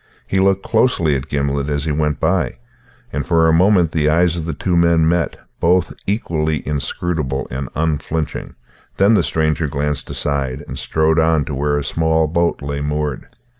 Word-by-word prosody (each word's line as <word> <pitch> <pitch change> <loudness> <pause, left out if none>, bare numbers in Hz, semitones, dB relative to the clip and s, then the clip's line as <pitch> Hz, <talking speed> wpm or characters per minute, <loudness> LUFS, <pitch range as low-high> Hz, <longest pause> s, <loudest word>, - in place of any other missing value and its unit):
He 95 - 0
looked 95 0 +2
closely 110 - +2
at 65 - -4
Gimblet 70 0 -1
as 70 -1 -1
he 80 - -1
went 75 -1 0
by, - - +1 0.6
and 75 +1 -1
for 80 -1 +3
a 80 - +4
moment 90 -1 +4
the 75 -2 +1
eyes 85 +2 +3
of 85 -2 -4
the 80 - -3
two 90 +2 -1
men 85 -1 +4
met, 85 0 0 0.2
both 90 +1 +2
equally 80 -7 -1
inscrutable 75 -1 -2
and 65 +1 -4
unflinching; 80 0 -2 0.4
then 100 +3 +5
the 105 - +4
stranger 80 0 0
glanced 75 +1 -2
aside 70 -1 -2
and - - -6
strode 80 +1 +1
on 80 -2 +2
to 75 - -5
where 75 +2 0
a 75 - -1
small 80 +2 +1
boat 85 -1 0
lay 70 0 -3
moored. 75 -1 -2
80 Hz, 175 wpm, -19 LUFS, 75-85 Hz, 0.6 s, then